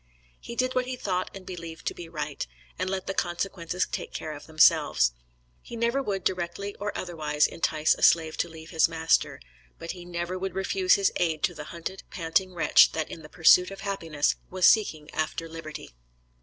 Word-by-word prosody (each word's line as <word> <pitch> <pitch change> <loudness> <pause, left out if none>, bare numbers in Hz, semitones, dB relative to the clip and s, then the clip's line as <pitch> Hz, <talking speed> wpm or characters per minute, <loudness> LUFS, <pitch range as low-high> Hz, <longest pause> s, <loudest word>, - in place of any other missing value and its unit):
He 235 - -8
did 255 +1 0
what 255 0 0
he 255 - -3
thought 185 -6 -2
and 190 -1 -9
believed 170 -3 -8
to - - -1
be 170 -2 -9
right, - - -4 0.3
and 185 - -1
let 190 -1 -3
the 195 - -2
consequences 180 -1 -2
take - - -5
care 155 - -5
of 145 - -11
themselves. 150 - +4 0.5
He - - -9
never 235 +4 +1
would 195 -7 -3
directly 185 +2 -2
or 205 +1 -2
otherwise, 155 -4 0
entice 155 -1 +1
a - - -9
slave 160 -2 +4
to 170 - -1
leave 160 0 -11
his 165 -1 +4
master; 160 -1 +1 0.4
but 165 - -5
he 180 -1 -9
never 175 +1 -4
would 190 -1 -4
refuse 190 -1 +3
his 200 -1 +2
aid 160 -3 0
to - - +2
the 150 - -8
hunted, 170 +4 -6
panting 180 +2 0
wretch 170 - +6
that 160 -1 -3
in 165 - -8
the 150 - -12
pursuit 180 +2 +6
of 195 - -9
happiness 165 -7 -1
was 185 -1 +1
seeking 160 -9 +4
after 160 +1 -2
liberty. 160 - -8
175 Hz, 195 wpm, -27 LUFS, 160-190 Hz, 0.5 s, wretch